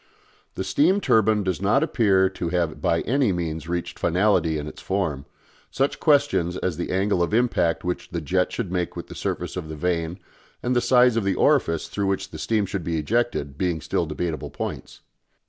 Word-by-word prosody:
The - - -2
steam 150 - +3
turbine 110 - +3
does 95 -2 -2
not 110 +9 +3
appear 100 -11 +3
to 90 -2 -4
have 85 -2 -1
by 85 - +2
any 130 -2 +1
means 80 -2 -3
reached 85 0 -3
finality 85 -3 +2
in 75 - -4
its 75 - -9
form, 80 -8 -2 0.4
such 135 +1 -1
questions 140 - +2
as 90 -3 -2
the 85 - -4
angle 95 0 +1
of 85 +5 +1
impact 115 -8 +1
which 90 0 -3
the 85 - -3
jet 90 +4 0
should 105 -7 -4
make 90 -2 -2
with - - -7
the - - -7
surface - - -3
of 80 - -5
the 80 - -5
vane, 85 +1 -1 0.5
and 125 +1 0
the 120 - +3
size 125 -1 +4
of 115 - +1
the 100 -1 +1
orifice 80 -2 +2
through 100 -1 -2
which 95 0 -2
the - - -8
steam 110 -3 +1
should 95 -1 -4
be 85 0 -1
ejected, 80 - -1
being 90 -3 0
still 85 +2 -1
debatable 80 +1 -3
points. - - -6
95 Hz, 200 wpm, -24 LUFS, 85-110 Hz, 0.5 s, size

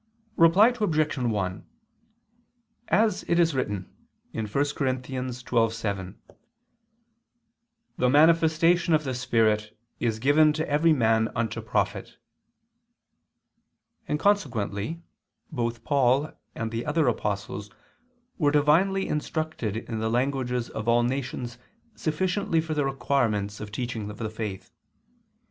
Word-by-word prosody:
Reply 175 +7 +6
Obj. 160 -12 0
1: 105 -6 -2 1.2
As 210 +1 +2
it 170 - +2
is 165 -2 +3
written 105 -8 -2 0.4
(1 110 -1 -3
Cor. 140 +7 +1
12:7), 125 -7 -2 1.8
"the 125 - +3
manifestation 165 +3 +4
of 155 - 0
the 130 -3 -3
Spirit 110 -4 +1 0.2
is 115 -2 0
given 145 +5 +4
to 155 +1 -2
every 150 +3 +3
man 110 -5 +3
unto 115 -3 -2
profit"; - - -2 1.9
and 150 - -1
consequently 135 - 0 0.5
both 120 -4 -3
Paul 140 +1 +2 0.2
and 115 -1 -3
the 115 +1 -3
other 150 -1 +2
apostles 105 -3 -2 0.7
were 145 -4 +3
divinely 165 +7 +3
instructed 150 -8 -2
in 115 0 -5
the 110 0 -1
languages 125 0 -1
of 110 +1 -5
all 120 +1 +4
nations 125 -1 -3 0.3
sufficiently 180 +3 0
for 160 0 -2
the 145 -2 0
requirements 120 -6 0
of 105 - -6
the 105 - -16
teaching 115 -3 -4
of 105 - -9
the 110 -2 -4
faith. 105 -4 -6
130 Hz, 115 wpm, -26 LUFS, 110-155 Hz, 1.9 s, Reply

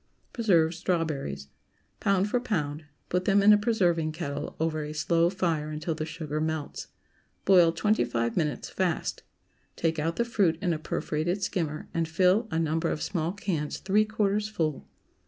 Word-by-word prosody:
PRESERVED 175 -8 +3
STRAWBERRIES. 160 - -2
✠ - - -32 0.5
Pound 195 0 +2
for 245 +4 +1
pound. 155 -10 -2 0.2
Put 180 +1 0
them 200 0 +4
in 210 +1 +8
a - - +6
preserving 175 -8 +1
kettle 145 -1 -4
over 155 -1 0
a 150 +1 -6
slow 165 +2 +2
fire 165 -5 -1
until 155 +2 -3
the 155 0 -4
sugar 155 -2 -4
melts. 160 -2 -3 0.6
Boil 180 -4 +6
twenty 210 - +2
five 115 -1 -1
minutes, 150 -4 -1
fast. 180 -4 -1 0.5
Take 165 -1 0
out 165 +2 -1
the 235 - +1
fruit 195 -8 +2
in 180 -3 0
a 155 - -3
perforated 170 +5 -2
skimmer 160 -6 -2
and 165 -1 0
fill 185 +7 +3
a 160 - -2
number 165 +1 0
of - - -2
small 170 -3 -1
cans 175 -6 -3
three 205 +3 +2
quarters 210 0 0
full. 160 -8 -2
165 Hz, 170 wpm, -28 LUFS, 155-195 Hz, 0.6 s, in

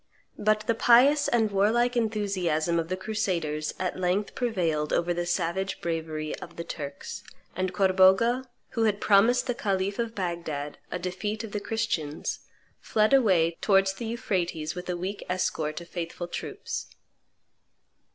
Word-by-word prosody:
But 215 0 +2
the 225 +2 +1
pious 255 +6 +5
and 225 -3 +2
warlike 230 +5 +2
enthusiasm 190 -8 0
of 165 - -2
the 185 +2 -2
crusaders 175 -8 -2
at 185 0 -2
length 185 +3 0
prevailed 170 -11 0
over 175 +1 +1
the 175 0 -2
savage 185 +3 -1
bravery 160 -2 -3
of 170 - -10
the 170 - -5
Turks; 145 -4 -6 0.3
and 185 0 -1
Corbogha, 190 +6 +4 0.2
who 230 -2 0
had 205 -2 +1
promised 225 +6 +4
the 245 - 0
khalif 200 -2 -1
of 230 -1 -2
Bagdad 170 -6 -3
a - - -2
defeat 190 +5 -3
of 220 - -7
the 210 - -2
Christians, 205 -10 -2 0.4
fled 215 +3 +2
away 180 -11 +4
towards 195 -1 +4
the 210 +4 -6
Euphrates 175 -8 -2
with 180 0 -7
a 180 - -1
weak 190 +3 -4
escort 160 -4 -1
of 170 - -11
faithful 175 0 -5
troops. - - -5
190 Hz, 150 wpm, -27 LUFS, 170-215 Hz, 0.4 s, pious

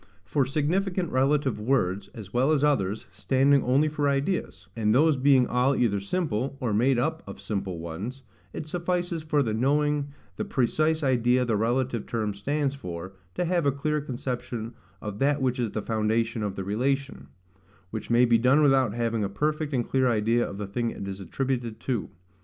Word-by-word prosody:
For 135 -3 +1
significant 175 +6 0
relative 135 -1 +1
words, 100 -5 0
as 105 -3 -10
well 130 +5 +3
as 150 -2 +2
others, 105 -9 +1
standing 135 +8 +3
only 135 +5 +3
for 150 -1 0
ideas; 140 +7 -2
and 110 -1 +2
those 155 +3 +5
being 130 -1 +4
all 125 +3 +2
either 105 -5 +1
simple, 135 - -2
or 120 -5 -1
made 125 +5 +3
up 120 - 0
of 100 - -8
simple 100 -3 -3
ones, 95 +11 -6 0.3
it 155 - -6
suffices 175 0 -2
for 150 -2 +1
the 110 -3 -1
knowing 145 +4 +1 0.3
the - - -1
precise 155 +5 +1
idea 125 -1 +3
the 115 -3 +1
relative 120 +1 0
term 110 -3 -1
stands 140 +7 -1
for, 90 -7 -7 0.2
to 180 - 0
have 170 -3 +1
a - - +4
clear 150 +2 -1
conception 125 -4 -4 0.3
of 105 -1 -5
that 145 +1 +2
which 130 -1 0
is 120 -3 0
the 105 0 -4
foundation 110 +1 0
of 100 -2 -2
the 95 - -4
relation; 120 - -1 0.6
which 110 - -5
may 120 +1 +5
be 115 -1 +4
done 130 +6 +4
without 135 -6 +3
having 115 -2 0
a 100 - -1
perfect 150 +7 -1
and 125 -4 -1
clear 130 -1 +2
idea 115 +1 +1
of 100 - -7
the 105 - -4
thing 115 +4 -2
it 100 - -6
is 95 0 -5
attributed 120 +3 -3
to. 125 -6 -2
125 Hz, 185 wpm, -26 LUFS, 110-140 Hz, 0.6 s, those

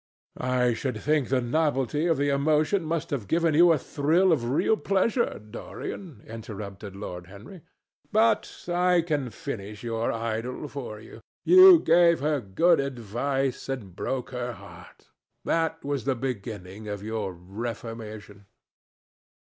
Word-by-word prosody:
"I 125 -1 +1
should 125 +3 -3
think 150 -3 +1
the 130 -1 +2
novelty 145 +3 0
of 165 - +2
the 145 +1 +1
emotion 155 +6 +2
must 165 +1 -3
have 125 -9 -3
given 165 -1 +2
you 170 +3 +6
a 160 - +4
thrill 160 +7 +2
of 120 -7 +1
real 145 - +2
pleasure, 215 +4 0
Dorian," 115 - -8
interrupted 105 -3 -8
Lord 90 -3 -7
Henry. 105 - -12 0.5
"But 220 +1 +1
I 180 0 +3
can 150 -6 -1
finish 110 -7 -7
your 115 -1 -1
idyll 115 +5 -3
for 125 -7 -7
you. 110 +1 -13 0.2
You 370 0 +9
gave 170 - +4
her 150 0 0
good 160 - +3
advice 135 +1 -2
and 110 -10 -5
broke 130 +4 -3
her 125 -1 -3
heart. - - -15 0.3
That 165 -1 0
was 140 -4 -2
the 135 -1 +1
beginning 110 -5 -5
of 105 -1 -5
your 110 -3 -3
reformation." 105 +1 -7
130 Hz, 140 wpm, -26 LUFS, 110-160 Hz, 0.5 s, You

